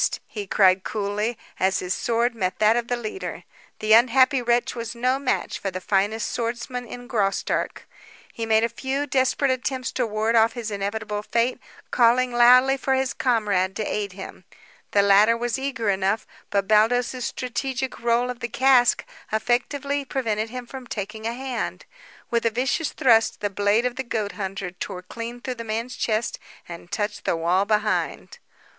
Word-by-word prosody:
he 210 Hz, -7 st, -7 dB
cried 185 Hz, -1 st, +4 dB
coolly, 210 Hz, +2 st, -2 dB, 0.2 s
as 190 Hz, 0 st, +2 dB
his 180 Hz, 0 st, -2 dB
sword 235 Hz, +3 st, 0 dB
met 185 Hz, -5 st, -2 dB
that 215 Hz, +1 st, +4 dB
of 240 Hz, -1 st, -1 dB
the 245 Hz, -, -1 dB
leader. 240 Hz, -, -6 dB, 0.3 s
The 215 Hz, 0 st, +2 dB
unhappy 255 Hz, +3 st, +5 dB
wretch 240 Hz, 0 st, +1 dB
was 230 Hz, -1 st, -5 dB
no 255 Hz, +3 st, +1 dB
match 275 Hz, -2 st, -1 dB
for 195 Hz, -, -2 dB
the 185 Hz, -1 st, -5 dB
finest 205 Hz, +3 st, 0 dB
swordsman 240 Hz, +1 st, -3 dB
in 245 Hz, +2 st, -8 dB
Graustark. 200 Hz, -5 st, -1 dB, 0.5 s
He 225 Hz, -1 st, -4 dB
made 220 Hz, 0 st, +4 dB
a -, -, +3 dB
few 265 Hz, +4 st, -2 dB
desperate 265 Hz, 0 st, +1 dB
attempts 255 Hz, 0 st, -2 dB
to 250 Hz, -3 st, -1 dB
ward 220 Hz, +2 st, 0 dB
off 225 Hz, 0 st, +4 dB
his 230 Hz, -3 st, -5 dB
inevitable 205 Hz, +1 st, -3 dB
fate, 235 Hz, +4 st, 0 dB, 0.3 s
calling 250 Hz, +1 st, +4 dB
loudly 250 Hz, +3 st, +6 dB
for 265 Hz, 0 st, 0 dB
his 260 Hz, -2 st, 0 dB
comrade 205 Hz, -7 st, +1 dB
to 215 Hz, -, -2 dB
aid 205 Hz, -2 st, -3 dB
him. 190 Hz, -1 st, -9 dB, 0.5 s
The 200 Hz, -, +3 dB
latter 205 Hz, +3 st, +5 dB
was 240 Hz, +2 st, -2 dB
eager 235 Hz, -6 st, -1 dB
enough, 195 Hz, +3 st, 0 dB, 0.2 s
but 200 Hz, -1 st, 0 dB
Baldos's 240 Hz, +4 st, +2 dB
strategic 260 Hz, +1 st, -3 dB
roll 235 Hz, +1 st, +1 dB
of 245 Hz, -, -9 dB
the 235 Hz, -1 st, -4 dB
cask 250 Hz, 0 st, +4 dB, 0.3 s
effectively 280 Hz, +6 st, 0 dB
prevented 225 Hz, -5 st, -2 dB
him 250 Hz, +1 st, -6 dB
from 260 Hz, 0 st, -9 dB
taking 220 Hz, +1 st, -5 dB
a 230 Hz, -, -2 dB
hand. 260 Hz, 0 st, -4 dB, 0.5 s
With 235 Hz, -1 st, +1 dB
a 230 Hz, -, +3 dB
vicious 265 Hz, +7 st, -1 dB
thrust, 230 Hz, -3 st, +3 dB
the 205 Hz, -1 st, -2 dB
blade 205 Hz, +4 st, +2 dB
of 250 Hz, 0 st, -2 dB
the 265 Hz, -, -2 dB
goat 215 Hz, -4 st, -2 dB
hunter 195 Hz, -2 st, -5 dB
tore 180 Hz, 0 st, -6 dB
clean 235 Hz, +5 st, -7 dB
through 255 Hz, -, -3 dB
the -, -, -5 dB
man's 230 Hz, +3 st, -3 dB
chest 220 Hz, 0 st, -1 dB, 0.3 s
and 170 Hz, 0 st, -10 dB
touched 210 Hz, -1 st, -3 dB
the -, -, +1 dB
wall 175 Hz, +4 st, +2 dB
behind. 215 Hz, -, -1 dB
230 Hz, 175 wpm, -24 LUFS, 210-250 Hz, 0.5 s, loudly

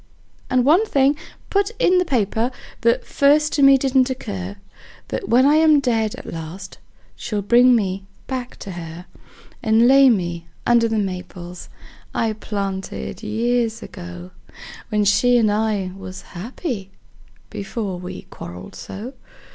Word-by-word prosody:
And 250 Hz, -1 st, +2 dB
one 330 Hz, +9 st, +5 dB
thing 275 Hz, -2 st, +3 dB, 0.4 s
put 400 Hz, 0 st, +2 dB
in 365 Hz, -2 st, +4 dB
the 360 Hz, -, +1 dB
paper, 230 Hz, -, 0 dB, 0.3 s
that 235 Hz, 0 st, +2 dB
first 300 Hz, +2 st, +3 dB
to 290 Hz, -, +1 dB
me 275 Hz, 0 st, +8 dB
didn't 265 Hz, -1 st, +2 dB
occur: 200 Hz, -7 st, -5 dB, 0.5 s
That -, -, -4 dB
when 250 Hz, +3 st, +5 dB
I 295 Hz, +2 st, +5 dB
am 315 Hz, -2 st, +6 dB
dead 225 Hz, -5 st, 0 dB
at -, -, -11 dB
last 165 Hz, +4 st, -8 dB, 0.4 s
she'll 210 Hz, -3 st, -3 dB
bring 245 Hz, +4 st, +6 dB
me 195 Hz, -3 st, -1 dB, 0.2 s
back 255 Hz, -2 st, -5 dB
to 195 Hz, -, -6 dB
her; 170 Hz, 0 st, -8 dB, 0.6 s
And 225 Hz, +2 st, +4 dB
lay 270 Hz, +1 st, +7 dB
me 175 Hz, -6 st, -1 dB, 0.2 s
under 235 Hz, -1 st, +4 dB
the 225 Hz, -1 st, -1 dB
maples 180 Hz, -2 st, -5 dB, 0.5 s
I 225 Hz, -1 st, +1 dB
planted 200 Hz, -3 st, -4 dB
years 230 Hz, +1 st, 0 dB
ago, 85 Hz, +1 st, -9 dB, 0.6 s
When 210 Hz, -1 st, +1 dB
she 245 Hz, +5 st, +4 dB
and 220 Hz, -3 st, +3 dB
I 210 Hz, -3 st, 0 dB
was 185 Hz, -1 st, -9 dB
happy 215 Hz, -, -5 dB, 0.6 s
before 200 Hz, -2 st, -4 dB
we 180 Hz, -, -7 dB
quarreled 90 Hz, +2 st, -9 dB
so. 225 Hz, +7 st, -8 dB
220 Hz, 140 wpm, -21 LUFS, 190-255 Hz, 0.6 s, me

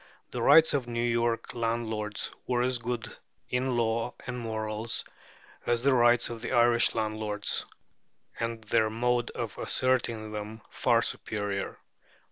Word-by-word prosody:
The -, -, -3 dB
rights 160 Hz, 0 st, +7 dB
of 135 Hz, -4 st, +1 dB
the 120 Hz, -, -8 dB
New 115 Hz, 0 st, 0 dB
York 115 Hz, -1 st, 0 dB
landlords 115 Hz, -2 st, -2 dB, 0.2 s
were 125 Hz, -1 st, +2 dB
as 125 Hz, -1 st, +1 dB
good 120 Hz, 0 st, -4 dB, 0.3 s
in 125 Hz, 0 st, 0 dB
law 115 Hz, +1 st, 0 dB
and 125 Hz, 0 st, -4 dB
morals 110 Hz, -1 st, -2 dB, 0.6 s
as 120 Hz, 0 st, +1 dB
the 140 Hz, 0 st, +4 dB
rights 120 Hz, -1 st, +4 dB
of 115 Hz, -1 st, -6 dB
the -, -, -3 dB
Irish 120 Hz, 0 st, +4 dB
landlords, 110 Hz, -2 st, -2 dB, 0.7 s
and 115 Hz, -1 st, -3 dB
their 110 Hz, +1 st, +2 dB
mode 120 Hz, +2 st, 0 dB
of 115 Hz, -4 st, -4 dB
asserting 115 Hz, -4 st, 0 dB
them 105 Hz, +1 st, -6 dB
far -, -, +3 dB
superior. 100 Hz, -2 st, -2 dB
115 Hz, 140 wpm, -29 LUFS, 110-120 Hz, 0.7 s, rights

